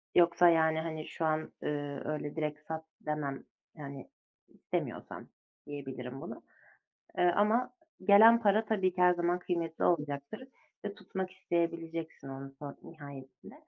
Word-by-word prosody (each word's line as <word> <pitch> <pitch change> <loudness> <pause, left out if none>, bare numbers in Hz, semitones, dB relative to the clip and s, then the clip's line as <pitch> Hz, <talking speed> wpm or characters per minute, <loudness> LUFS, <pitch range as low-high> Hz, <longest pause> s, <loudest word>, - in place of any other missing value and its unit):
yoksa, 175 0 +6
yani, 160 -1 +4
hani, 160 -1 -4
şu 165 - -3
an, 155 0 0
eee, 145 -1 -2
öyle 150 -1 -3
"Direkt 150 -2 -2
sat." 160 0 -4 0.2
demem. 150 -3 -2 0.3
Yani, 140 -3 -8 0.4
istemiyorsan - - -5 0.4
diyebilirim 135 -2 -6
bunu. - - -8 0.8
Eee, - - +4
ama 215 +5 +3 0.3
gelen 225 +4 +8
para 210 +1 +4
tabii 205 -4 +2
ki 180 - -3
her 180 0 +7
zaman 175 0 +1
kıymetli 170 -2 -2
olacaktır 150 - -1 0.4
ve 205 -1 -3
tutmak 190 -3 -4
isteyebileceksin 165 -4 -2
onun 135 0 -8
son 145 -2 -7
nihayetinde. 140 - -11
160 Hz, 130 wpm, -32 LUFS, 145-180 Hz, 0.8 s, gelen